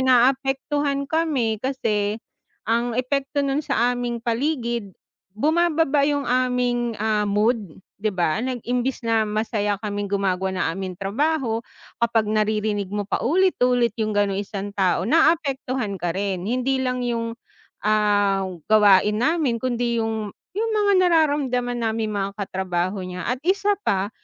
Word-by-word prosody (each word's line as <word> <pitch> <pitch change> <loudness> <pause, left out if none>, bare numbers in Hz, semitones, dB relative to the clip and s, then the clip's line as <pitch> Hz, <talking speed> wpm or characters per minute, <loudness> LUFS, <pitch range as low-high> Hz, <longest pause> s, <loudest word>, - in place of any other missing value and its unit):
naapektuhan 270 +3 +2
kami 275 -9 0
kasi, 215 -6 -1 0.5
ang 235 +1 0
epekto 275 +2 -1
no'n 275 +2 0
sa 245 -3 +1
aming 240 -1 -3
paligid, 235 -3 -1 0.5
bumababa 310 0 +2
'yung 285 -1 0
aming, 245 -2 0
ah, 210 -1 0
mood, 215 +3 +2 0.4
'di 215 - +1
ba, 180 0 0
nag 250 -2 -3
imbes 250 0 -1
na 225 -2 +2
masaya 210 -1 -1
kaming 205 -1 -3
gumagawa 190 -1 0
ng - - 0
aming 185 -1 -4
trabaho, 230 - 0 0.4
kapag 230 -2 +2
naririnig 210 -1 0
mo 205 +1 -3
paulit-ulit 250 - +2
'yung 215 -1 -1
gano'ng 200 -1 +1
isang 200 0 -5
tao, 185 -2 +1
naapektuhan 265 - +1
ka 175 - -1
rin, 195 -2 -1
hindi 260 +2 0
lang 250 -1 -1
'yung, 230 -1 -2 0.5
ah, 205 -2 +3 0.2
gawain 210 0 +5
namin 310 -6 +2
kundi 240 -2 0
'yung 220 -2 -3 0.2
'yung 455 +1 0
mga 410 -1 +3
nararamdaman 280 -7 +1
naming 220 -1 -1
mga 200 -1 -2
katrabaho 190 -1 -2
niya. 180 0 -6
At 250 - -1
isa 400 +1 +2
pa, 195 +1 +1
235 Hz, 135 wpm, -23 LUFS, 205-265 Hz, 0.5 s, gawain